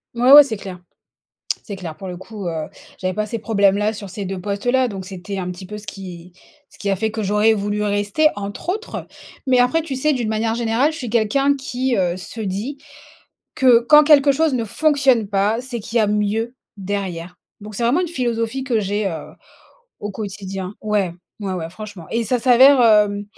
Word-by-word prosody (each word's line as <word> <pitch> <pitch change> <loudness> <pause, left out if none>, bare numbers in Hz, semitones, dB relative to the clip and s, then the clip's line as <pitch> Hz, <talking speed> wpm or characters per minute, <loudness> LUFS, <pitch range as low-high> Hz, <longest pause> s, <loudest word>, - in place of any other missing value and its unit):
Ouais, 250 +3 +4
ouais. 295 0 +11
C'est 225 -6 -4
clair 190 -2 -8 0.9
c'est 200 - -6
clair. 170 -4 -7
Pour 190 - -8
le 180 - -6
coup, 190 +1 -7
heu, 160 -2 -3 0.3
j'avais 185 0 -2
pas 215 - -1
ces 230 +2 -4
problèmes-là 210 -1 +2
sur 200 -3 -8
ces 200 +1 -5
2 190 -1 -5
postes-là, 245 +7 0
donc 195 -4 -6
c'était 190 +1 -6
un 180 -1 -3
petit 180 +1 -10
peu 210 +3 -7
ce 210 - -10
qui 180 -3 -9 0.4
ce - - -18
qui 200 - -2
a 195 - +1
fait 220 +2 -2
que 220 - -3
j'aurais 210 +2 +3
voulu 205 0 -2
rester, 205 +8 +1
entre 205 - -5
autres. 430 +5 -5 0.4
Mais 255 -1 +4
après 250 +7 +2
tu 300 -4 -5
sais 300 +4 +1
d'une 240 -5 -2
manière 225 +1 -1
générale, 235 +5 +1
je 315 - -8
suis 245 -6 -5
quelqu'un 270 +5 +2
qui, 260 -2 -2
heu, 180 -2 0
se 205 +5 -7
dit 215 +8 -4 0.8
que 250 -4 +6
quand 300 +5 +6
quelque 290 -2 +6
chose 300 +1 +2
ne 240 - 0
fonctionne 270 -2 +2
pas, 205 +3 +1
c'est 250 -2 -5
qu'il 225 +3 -7
y - - +4
a 215 - +3
mieux 210 +3 -1 0.2
derrière. 185 -3 -4 0.3
Donc 210 +1 -10
c'est 215 - -4
vraiment 240 +9 +3
une 365 - -1
philosophie 245 -3 -2
que 250 -4 0
j'ai, 205 0 -1
heu, 160 -4 -7 0.7
au 205 -1 -5
quotidien. 195 -2 -6
Ouais, 205 -5 0 0.3
ouais, 195 -2 -3
ouais. 165 -2 -5
Franchement 205 -2 -10
et 230 - +1
ça 245 +3 0
s'avère, 260 +3 +6
hem 210 -3 +4
215 Hz, 205 wpm, -20 LUFS, 195-245 Hz, 0.9 s, ouais